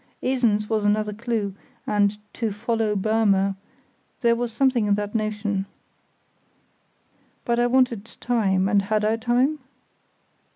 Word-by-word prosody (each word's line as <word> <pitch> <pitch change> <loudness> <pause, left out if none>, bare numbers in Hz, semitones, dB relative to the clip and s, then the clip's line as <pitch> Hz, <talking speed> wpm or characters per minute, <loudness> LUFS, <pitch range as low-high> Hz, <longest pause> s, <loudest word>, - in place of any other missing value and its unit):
Esens 235 -5 +1
was 220 -1 0
another 210 0 +1
clue, 220 -3 -2 0.3
and 205 0 +1 0.2
"to 225 -3 -2
follow 220 0 -1
Burmer"—there 215 +3 -1
was 240 0 -2
something 240 -2 +2
in 205 - +3
that 205 0 -4
notion. 210 -3 -2 1.8
But 235 0 +1
I 240 - +3
wanted 245 -4 +2
time, 195 -6 +1
and 200 0 +3
had 210 +1 0
I 220 +1 +2
time? 250 +6 +1
215 Hz, 120 wpm, -24 LUFS, 205-235 Hz, 1.8 s, in